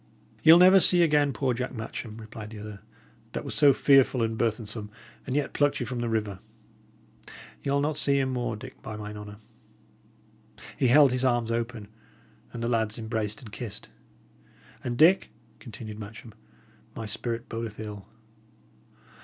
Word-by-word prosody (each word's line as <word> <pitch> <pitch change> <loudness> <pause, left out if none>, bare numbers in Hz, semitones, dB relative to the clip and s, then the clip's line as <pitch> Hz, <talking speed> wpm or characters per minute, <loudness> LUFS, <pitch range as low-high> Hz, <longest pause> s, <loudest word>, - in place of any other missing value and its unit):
"Ye'll 160 +1 +9
never 185 +2 +8 0.2
again 150 -4 +4
see - - -3
poor 130 -3 0
Jack 125 +2 -4
Matcham," 110 0 -6
replied 110 -1 -9
the 110 - -10
other, 105 -1 -8 0.5
"that - - -4
was - - -5
so 145 -2 +6
fearful 135 -2 +4
and 115 0 -1
burthensome, 110 -2 -2 0.4
and 130 - -2
yet 145 -1 -1
plucked 145 -1 +2
you 125 - -2
from 120 +1 -4
the 120 -1 -2
river; 105 -4 -2 1.2
ye'll 140 0 0
not 150 +1 -1
see 140 -1 +2
him 130 -1 0
more, 120 -2 -2
Dick, 105 - -11
by 110 - -7
mine 105 0 -7
honour!" 105 0 -9 1.4
He 130 - +2
held 140 +2 +6
his 125 0 0
arms 120 -3 +1
open, 115 -2 -3 0.6
and 115 - -6
the - - 0
lads 110 -2 0
embraced 110 -1 -3
and 110 - -11
kissed. 105 -2 -7 0.9
"And, 120 -1 -3
Dick," 175 +7 +5 0.3
continued 110 -2 -9
Matcham, 110 +1 -10 0.6
"my 115 - -5
spirit 115 +2 -4
bodeth 115 -2 -6
ill. 105 -2 -7
115 Hz, 160 wpm, -27 LUFS, 110-130 Hz, 1.4 s, Ye'll